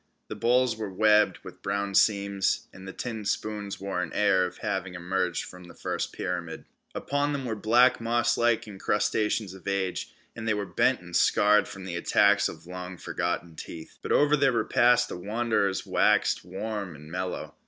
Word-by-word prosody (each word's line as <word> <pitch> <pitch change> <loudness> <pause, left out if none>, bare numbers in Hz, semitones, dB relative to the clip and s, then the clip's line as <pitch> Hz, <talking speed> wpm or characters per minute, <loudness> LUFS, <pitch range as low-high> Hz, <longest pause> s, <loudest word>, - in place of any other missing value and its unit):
The - - -5
bowls 125 -1 +2
were 110 -3 -4
webbed 105 +2 +4
with - - -11
brown 100 0 -2
seams, 100 -1 +2
and 95 0 -11
the - - -5
tin 110 0 -5
spoons 105 0 -3
wore 95 -2 -2
an - - -4
air 95 -3 +3
of - - -11
having 95 -2 -3
emerged 90 0 -1
from 90 -1 -12
the 85 - -14
first - - -3
pyramid. 85 -2 -4 0.3
Upon 145 +1 -1
them 135 -2 -3
were 115 -2 -2
black 120 +4 +4
mosslike 120 0 +2
encrustations 105 0 -1
of 95 -2 -13
age, 95 -2 -2 0.2
and 110 - -6
they 110 - +2
were 105 -1 -2
bent - - +1
and - - -9
scarred 105 0 +4
from 100 - -9
the 85 -2 -4
attacks 85 - +3
of - - -11
long 90 0 -7
forgotten 85 -1 -3
teeth. 80 +1 -10
But - - -5
over 150 +1 +4
their 140 -3 +3
repast 120 +2 +3
the - - -6
wanderers 105 0 0
waxed - - +2
warm 100 0 -5
and 75 +1 -13
mellow. 90 +1 -4
100 Hz, 175 wpm, -27 LUFS, 90-110 Hz, 0.3 s, webbed